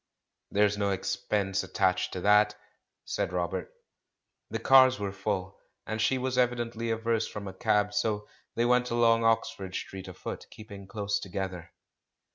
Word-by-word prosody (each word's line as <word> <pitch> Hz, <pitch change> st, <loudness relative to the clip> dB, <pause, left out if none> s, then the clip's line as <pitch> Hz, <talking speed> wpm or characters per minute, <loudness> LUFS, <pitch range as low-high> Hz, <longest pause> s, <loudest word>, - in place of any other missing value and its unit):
"There's 105 Hz, 0 st, +2 dB
no 100 Hz, -1 st, +1 dB
expense 100 Hz, +1 st, -1 dB
attached 95 Hz, -1 st, +1 dB
to 90 Hz, -, -4 dB
that," 105 Hz, +1 st, +4 dB, 0.5 s
said -, -, -2 dB
Robert. 90 Hz, +1 st, -2 dB, 0.8 s
The 115 Hz, -, -2 dB
cars 130 Hz, +2 st, +6 dB
were 100 Hz, -1 st, -2 dB
full, 100 Hz, -1 st, -3 dB, 0.3 s
and 110 Hz, 0 st, -3 dB
she 130 Hz, +4 st, +2 dB
was 130 Hz, 0 st, -1 dB
evidently 120 Hz, -2 st, 0 dB
averse 115 Hz, 0 st, 0 dB
from 100 Hz, -1 st, -7 dB
a 95 Hz, -, -6 dB
cab; 105 Hz, +2 st, +1 dB
so 105 Hz, -1 st, -1 dB, 0.3 s
they 120 Hz, -, +2 dB
went 125 Hz, 0 st, +3 dB
along 115 Hz, -1 st, +3 dB
Oxford 115 Hz, -4 st, 0 dB
Street 95 Hz, -1 st, -6 dB
afoot, 95 Hz, -, -7 dB
keeping 100 Hz, -3 st, -11 dB
close 100 Hz, 0 st, -2 dB
together. 95 Hz, -3 st, -5 dB
105 Hz, 145 wpm, -29 LUFS, 95-115 Hz, 0.8 s, cars